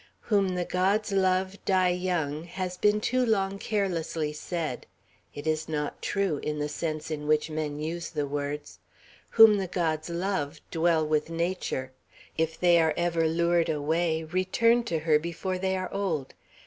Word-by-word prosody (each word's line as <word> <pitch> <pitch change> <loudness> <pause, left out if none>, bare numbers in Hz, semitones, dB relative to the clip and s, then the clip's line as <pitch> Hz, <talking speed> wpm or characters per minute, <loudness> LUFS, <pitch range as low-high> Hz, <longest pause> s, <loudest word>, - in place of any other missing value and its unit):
"Whom 195 -4 +1
the 180 -1 -1
gods 200 +5 +1
love, 190 0 +1
die 185 -2 +3
young," 175 -4 -1
has 180 +1 -4
been 210 +3 +3
too 255 +3 +1
long 195 -4 +1
carelessly 170 -8 -1
said. 155 -3 -4 0.5
It 145 - -7
is 155 0 -1
not 150 -2 -3
true, 195 -7 0
in 150 0 -3
the 150 0 -2
sense 155 +1 -4
in 150 -1 -4
which 155 +1 +2
men 155 -1 -3
use 165 +3 -4
the 150 -3 -2
words. 145 +1 -4 0.5
Whom 225 -2 +8
the 190 -2 -2
gods 160 -3 -1
love, 170 -4 -2
dwell 165 -1 +2
with 155 0 0
nature; 165 -6 -2 0.4
if 160 0 -1
they 175 -1 +5
are 160 -2 +2
ever 170 -2 +1
lured 170 +1 +2
away, 160 +2 0
return 185 +8 +2
to 170 - -1
her 155 -2 +3
before 170 +3 -3
they 190 0 0
are 185 0 -4
old. 175 -9 -2
170 Hz, 160 wpm, -28 LUFS, 155-185 Hz, 0.5 s, Whom